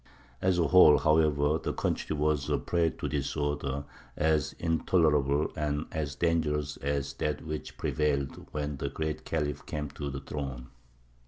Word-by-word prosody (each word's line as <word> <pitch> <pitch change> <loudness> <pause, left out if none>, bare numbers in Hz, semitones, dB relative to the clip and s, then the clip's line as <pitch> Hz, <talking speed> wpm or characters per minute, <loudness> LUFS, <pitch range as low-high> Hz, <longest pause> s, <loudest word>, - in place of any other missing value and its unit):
As 95 -1 +2
a 85 - +3
whole, 85 -5 +8
however, 75 0 +3
the - - -3
country 80 - -1
was 75 -1 0
a - - +2
prey 85 -2 +1
to - - -5
disorder 70 -1 -2 0.3
as 80 -2 +2
intolerable 75 -4 +2
and 75 0 -1
as 75 -3 -3
dangerous 75 -4 0
as 70 0 -2
that 75 +1 -2
which 75 -1 -4
had - - -19
prevailed 70 -3 -1
when 75 -1 -3
the 70 - -2
Great 80 +1 -3
Khalif 75 -3 -2
came 75 -2 -4
to 70 -1 -5
the 70 0 -5
throne. 65 -4 -5
75 Hz, 155 wpm, -29 LUFS, 70-80 Hz, 0.3 s, whole